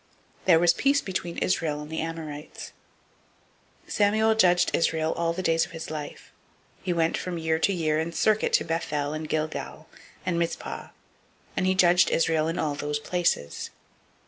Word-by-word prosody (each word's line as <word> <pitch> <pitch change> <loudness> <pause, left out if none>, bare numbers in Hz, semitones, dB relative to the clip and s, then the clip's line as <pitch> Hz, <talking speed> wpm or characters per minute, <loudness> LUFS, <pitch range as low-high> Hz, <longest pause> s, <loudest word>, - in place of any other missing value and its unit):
There 175 -3 +6
was 175 +1 +5
peace 280 +1 +2
between 180 -6 -4
Israel 155 -5 0
and 150 +1 -8
the 160 - -3
Amorites. 160 -2 -7 1.1
007:015 - - -14
Samuel 220 +2 +3
judged 180 -5 +4
Israel 160 -1 +1
all 170 0 0
the 185 +2 -4
days 165 -1 +3
of - - -7
his 165 -1 -6
life. 150 -2 -7 0.5
007:016 - - -29
He 180 - +1
went 165 -1 +1
from 180 -1 -4
year 160 0 0
to 200 - +2
year 155 -4 0
in 160 +1 -2
circuit 215 +4 +2
to - - +3
Bethel 150 -3 -2
and 155 0 -5
Gilgal, 155 0 -3 0.4
and 170 -2 0
Mizpah; 170 0 -3 0.7
and 185 - +1
he 185 - +2
judged 180 -1 +5
Israel 160 -1 +2
in 165 - -2
all 150 -2 0
those 145 0 -2
places. 150 - -1
165 Hz, 170 wpm, -26 LUFS, 155-180 Hz, 1.1 s, There